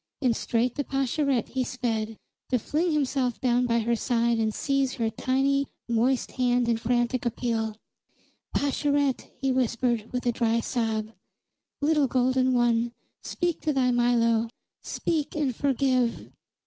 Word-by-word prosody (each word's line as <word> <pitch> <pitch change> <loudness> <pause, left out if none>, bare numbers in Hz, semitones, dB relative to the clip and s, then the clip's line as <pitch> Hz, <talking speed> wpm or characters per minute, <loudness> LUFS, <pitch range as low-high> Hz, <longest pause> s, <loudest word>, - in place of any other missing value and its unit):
And 250 -5 +2
straight 235 +2 0
to 285 - 0
Pascherette 270 -2 0
he 260 0 -1
sped, 225 -4 -2 0.3
to 255 - +3
fling 315 +9 0
himself 270 -5 0
down 245 -1 +2
by 235 -1 +2
her 235 +2 +1
side 235 -1 +1
and 220 -1 +1
seize 275 +2 0
her 225 -2 -1
tiny, 275 +2 +1 0.2
moist 240 +2 +1
hand 245 -1 +1
in 230 -1 +2
frantic 240 +1 0
appeal. 225 -2 -2 0.7
"Pascherette!" 285 -1 0
he 270 -1 +1
whispered 240 -3 0
with 250 0 -3
a 240 - +3
dry 230 0 +1
sob. 225 -2 -2 0.7
"Little 295 -1 +3
golden 255 0 +2
one, 240 -1 +2 0.3
speak 350 -2 -2
to 305 - 0
thy 255 -2 +2
Milo. 235 -2 +2 0.3
Speak, 315 -4 -2
and 285 -6 0
forgive!" 255 -3 0
250 Hz, 140 wpm, -26 LUFS, 235-270 Hz, 0.7 s, to